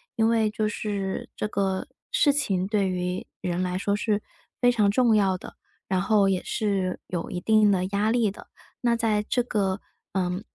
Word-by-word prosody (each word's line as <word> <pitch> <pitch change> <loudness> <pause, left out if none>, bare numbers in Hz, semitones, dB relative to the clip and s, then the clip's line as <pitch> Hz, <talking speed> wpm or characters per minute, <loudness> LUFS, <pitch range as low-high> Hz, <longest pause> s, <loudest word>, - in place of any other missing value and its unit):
因 225 0 +3
为 225 -2 +3
就 215 0 -1
是 200 -2 -3
这 - - -2
个 195 0 -1 0.2
事 285 - +4
情 195 -11 0
对 200 -2 +1
于 180 0 -2
人 180 -1 -2
来 180 0 -1
说 200 +2 0
是 210 -1 0 0.4
非 245 0 +5
常 210 -4 +3
重 230 0 +4
要 190 -3 +3
的， - - -11 0.3
然 185 -1 +1
后 200 0 +3
也 190 -2 0
是 195 -4 -1
有 175 -2 -4
一 180 - -3
定 215 +2 +4
的 185 -2 +1
压 205 +2 +1
力 225 -4 +2
的。 - - -13 0.3
那 235 -1 +3
在 215 -2 +1
这 245 - +2
个 200 -4 0 0.3
呃， 180 0 -1
200 Hz, 200 characters per minute, -26 LUFS, 190-220 Hz, 0.4 s, 非